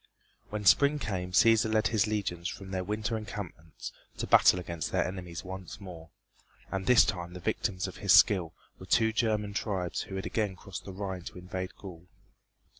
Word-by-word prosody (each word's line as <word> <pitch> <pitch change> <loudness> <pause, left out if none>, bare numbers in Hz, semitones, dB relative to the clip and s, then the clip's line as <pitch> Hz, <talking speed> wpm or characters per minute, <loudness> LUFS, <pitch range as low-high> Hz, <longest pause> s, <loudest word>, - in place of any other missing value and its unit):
When 105 0 -4
spring 140 +7 +5
came 95 -9 -3
Cæsar 110 +3 +5
led 110 0 +2
his 110 0 +2
legions 95 -5 -2
from 95 -1 -8
their 95 -1 -2
winter 105 +3 -2
encampments 100 -7 -7 0.3
to - - -2
battle 90 - +6
against 85 -3 -4
their - - +1
enemies 90 -2 -6
once 95 0 -8
more, 85 -5 -10 0.6
and 95 0 -3
this 125 -2 +7
time 90 -1 -4
the - - -6
victims 95 -1 -1
of 95 - -9
his 100 - +1
skill 95 -6 +6 0.3
were 95 - -10
two 110 +1 +3
German 105 -3 0
tribes 95 -5 -2
who 95 - -7
had 95 - -4
again 105 -4 -1
crossed 95 +1 -9
over 95 -1 -8
the 100 - -4
Rhine 95 -2 -4
to 105 - -8
invade 90 +1 -5
Gaul. 90 -3 -11
95 Hz, 190 wpm, -30 LUFS, 90-105 Hz, 0.6 s, this